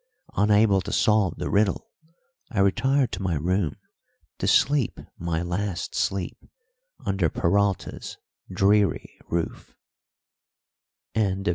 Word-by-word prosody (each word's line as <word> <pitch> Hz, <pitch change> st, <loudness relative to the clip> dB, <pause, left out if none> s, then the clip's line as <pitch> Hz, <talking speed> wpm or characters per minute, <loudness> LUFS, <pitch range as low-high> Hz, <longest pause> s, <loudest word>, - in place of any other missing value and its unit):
Unable 105 Hz, -1 st, +4 dB
to 100 Hz, -, -6 dB
solve 105 Hz, -5 st, +2 dB
the -, -, -3 dB
riddle, 100 Hz, -1 st, +1 dB, 0.6 s
I 110 Hz, -, -3 dB
retired 130 Hz, +7 st, +2 dB
to 90 Hz, -, -4 dB
my 90 Hz, -3 st, 0 dB
room 85 Hz, +1 st, 0 dB, 0.6 s
to -, -, -1 dB
sleep 140 Hz, -1 st, +3 dB, 0.2 s
my 85 Hz, -1 st, -1 dB
last 90 Hz, +1 st, -3 dB
sleep 95 Hz, -2 st, -2 dB, 0.7 s
under 95 Hz, -4 st, +1 dB
Peralta's 100 Hz, +4 st, -1 dB, 0.3 s
dreary 100 Hz, +2 st, +2 dB
roof. 85 Hz, -1 st, -3 dB
100 Hz, 100 wpm, -25 LUFS, 90-105 Hz, 0.7 s, Unable